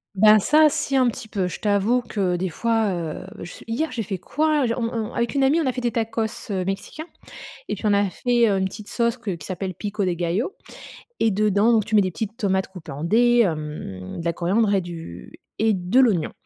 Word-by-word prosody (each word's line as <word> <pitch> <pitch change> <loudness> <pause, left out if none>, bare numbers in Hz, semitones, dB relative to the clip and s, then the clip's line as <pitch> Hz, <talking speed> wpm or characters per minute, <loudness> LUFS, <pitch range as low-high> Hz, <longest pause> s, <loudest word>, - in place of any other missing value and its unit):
Ben, 215 +2 +7
ça, 305 +9 +5
si 275 -1 -1
un 255 -2 +4
petit 235 0 -7
peu. 195 -4 -1
Je 180 - -6
t'avoue 210 +4 +2
que 190 -6 -1
des 185 +1 -2
fois, 225 +4 0
heu, 165 -3 -5
je 175 - -9
hier, 260 +8 -1
j'ai 235 -2 -3
fait 190 -2 -4
quoi? 300 - +1
J 230 - 0
on 245 - -2
on 225 0 -3
avec 235 -1 -1
une 280 - +1
amie, 285 +5 +4
on 320 - 0
a 260 - +2
fait 250 - -5
des 240 -1 0
tacos, 225 -1 -3
heu, 190 -2 -1
mexicains 200 - -5 0.6
et - - -1
puis, - - -4
on 205 - +4
a 200 0 +3
fait, 240 +5 +2
heu, 195 - +1
une 190 - +1
petite 205 +2 -8
sauce 235 0 0
que 240 -5 -5
qui 170 -5 -6
s'appelle 185 0 -4
pico 205 +2 -3
de 180 - +1
gallo, 175 - -1 0.7
et 225 - +4
dedans 210 +2 +3
donc 220 -3 +3
tu 215 - -1
mets 210 - +6
des 185 -1 -1
petites 220 +4 -5
tomates 190 -5 0
coupées 180 -5 -10
en 145 +4 -5
dés, 240 +5 +4
hem, 150 - -5
de 165 - -6
la 170 - +1
coriandre 200 +5 +1
et 195 - +2
du 165 - -9 0.3
et 220 0 +3
de 185 +6 +1
l'oignon, 205 -11 +2
210 Hz, 235 wpm, -23 LUFS, 185-235 Hz, 0.7 s, Ben